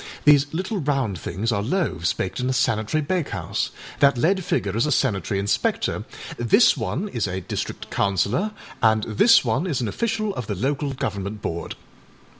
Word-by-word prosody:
These 145 -1 +5
little 190 +5 -2
round 135 - -1
things 100 +10 -2
are 100 -2 0
loaves 125 - 0
baked 95 - -3
in 125 +1 -1
a - - +1
sanitary 115 +3 +1
bakehouse. 170 +1 -2 0.3
That 140 -2 +5
lead 185 +8 +2
figure 100 -9 -1
is 115 +6 +2
a - - 0
sanitary 100 - +1
inspector, 100 +1 0 0.3
this 120 - +5
one 200 - -2
is 115 - -1
a 95 0 -3
district - - -5
councillor, 100 - +1 0.3
and 110 -1 +4
this 215 - +5
one 130 +10 0
is 150 -8 -1
an 120 - -1
official 215 - -1
of 125 - -5
the 105 - -2
Local 135 +6 -1
Government 105 -6 -4
Board. 85 0 -4
125 Hz, 170 wpm, -23 LUFS, 100-155 Hz, 0.3 s, These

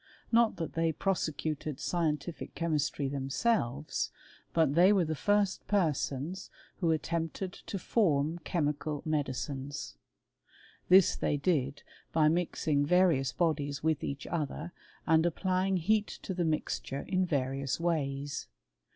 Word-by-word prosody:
Not 230 -1 +4
that 165 - -4
they 165 0 +1
prosecuted 155 -5 -2
scientific 165 -1 -2
che^; 170 - -2
mistry 145 -1 0
themselves; 140 - 0 0.4
but 160 -4 +3
they 180 +5 +6
were 190 -4 +3
the 155 - -1
first 205 +4 +1
persons 165 -2 -1 0.3
whd* 165 -2 +3
attempted 165 +4 -3
to 200 - -6
form 165 -5 +1
chemical 150 -3 -2
medicines. 140 - -3 0.9
This 185 0 +7
they 145 - 0
did^ 140 -3 0 0.3
by 155 -1 +4
mixing 160 -3 +1
various 155 -6 +3
bodies 145 -4 -1
with 160 -2 +1
each 140 0 -4
other, 155 +1 -3 0.3
and 160 0 +4
applying"' 185 +2 +1
heat 210 +5 +2 0.2
to 190 - -3
the 175 -1 0
mixture 155 -3 -2
in 185 -1 +1
various 135 -4 -1
ways. 145 -4 -1
160 Hz, 125 wpm, -31 LUFS, 145-180 Hz, 0.9 s, This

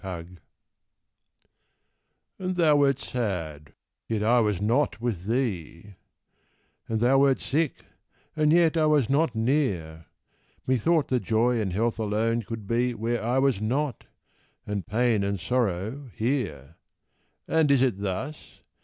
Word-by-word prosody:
And 90 -3 -6 2.1
thou 180 -5 +2
wert 140 -2 +3
sad 85 - -4 0.3
yet 110 -2 -1
I 120 +3 +4
was 105 -5 +1
not 115 +8 +1
with 110 -7 -3
thee; 105 - -3 1.0
And 110 -1 0
thou 130 +3 +4
wert 135 -1 +4
sick, 150 +1 -2 0.5
and 155 -1 +3
yet 170 -1 +4
I 155 -1 +3
was 145 -5 +2
not 145 -3 +2
near; 100 - -1 0.6
Methought 140 +5 +1
that 125 -2 +1
Joy 115 +1 +1
and 95 -3 -2
Health 115 +5 -1
alone 110 +2 0
could 110 -1 -7
be 120 +3 0
Where 115 +1 -2
I 120 +3 0
was 135 -6 +2
not 130 +4 -2 0.6
and 100 -4 -4
pain 115 -1 +1
and 100 -1 -2
sorrow 115 - -2
here! 95 - -3 0.7
And 160 -2 +2
is 135 -2 +4
it 120 -7 0
thus? 105 +10 -5
115 Hz, 130 wpm, -26 LUFS, 100-135 Hz, 2.1 s, I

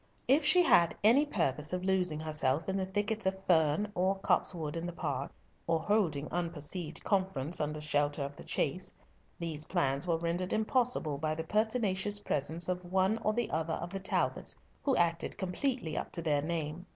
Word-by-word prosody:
If 280 +5 +4
she 360 -1 +6
had 170 - +5
any 260 +8 +5
purpose 150 - 0
of 180 0 -2
losing 180 -5 +1
herself 155 -1 0
in 190 - -1
the 190 -1 -1
thickets 210 +2 -1
of 190 0 0
fern, 160 +4 +3
or 190 +1 +1
copsewood, 165 -5 0
in 165 +1 -3
the 175 - -5
park, 145 -5 -3 0.4
or 165 -1 +2
holding 160 -6 +1
unperceived 165 -1 -3
conference 180 -7 0
under 150 0 -2
shelter 145 -1 0
of 140 +1 -5
the - - -10
chase, 180 +6 -1 0.5
these 160 -3 -3
plans 140 +4 0
were 165 -2 +2
rendered 170 +2 -2
impossible 220 - +1
by 155 +1 -1
the 160 - -3
pertinacious 210 0 0
presence 160 -1 -2
of 180 -1 -3
one 190 +4 +2
or 215 -1 0 0.2
other 160 0 -1
of 175 - -6
the 195 - -2
Talbots, 190 - -1 0.3
who 275 -2 +2
acted 170 -1 0
completely 190 - -1
up - - -3
to 170 - -1
their 150 -3 +2
name. 160 +2 -3
170 Hz, 175 wpm, -32 LUFS, 155-195 Hz, 0.5 s, she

